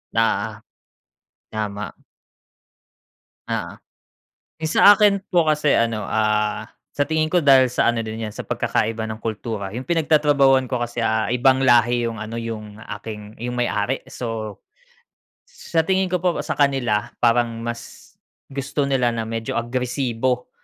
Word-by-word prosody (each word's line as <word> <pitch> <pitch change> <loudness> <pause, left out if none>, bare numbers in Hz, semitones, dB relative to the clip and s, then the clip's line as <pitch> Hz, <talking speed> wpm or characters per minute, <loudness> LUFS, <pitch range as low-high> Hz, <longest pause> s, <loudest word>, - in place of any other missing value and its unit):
Oo. - - +1 1.0
Tama. 105 -1 -4 1.6
Oo. - - -3 0.9
Yung 160 0 -2
sa 205 0 +8
akin 205 -2 +4
po 175 -3 +3
kasi 150 -1 +3
ano, 115 -2 +1
ah, 105 -1 0 0.3
sa 145 - +2
tingin 155 +1 0
ko 175 -1 +1
dahil 135 -2 +6
sa 120 -1 +2
ano 115 - -2
din 110 0 -5
yan 105 - -5
sa - - -8
pagkakaiba 110 0 -1
ng 110 0 -6
kultura. 110 -2 -4
yung 125 - -4
pinagtatrabahuhan 145 -5 +3
ko 125 -1 -3
kasi, 120 -1 -2
ah, 110 -1 +1
ibang 130 +2 +3
lahi 120 -2 +4
yung 115 - -6
ano 110 +2 -5
yung 110 -2 -7
aking 105 0 -8
yung 120 +2 -4
may 120 -1 0
ari 120 +6 -1
so 110 -4 -5 0.9
sa 160 -1 -2
tingin 190 -1 +1
ko 180 - +1
po 180 0 0
sa - - -4
kanila 120 -6 +1
parang 115 -1 +2
mas 120 0 -6 0.5
gusto 140 +2 -3
nila 125 -3 +2
na 115 -1 -3
medyo 115 0 -3
agresibo 125 +1 -1
120 Hz, 145 wpm, -22 LUFS, 110-140 Hz, 1.6 s, sa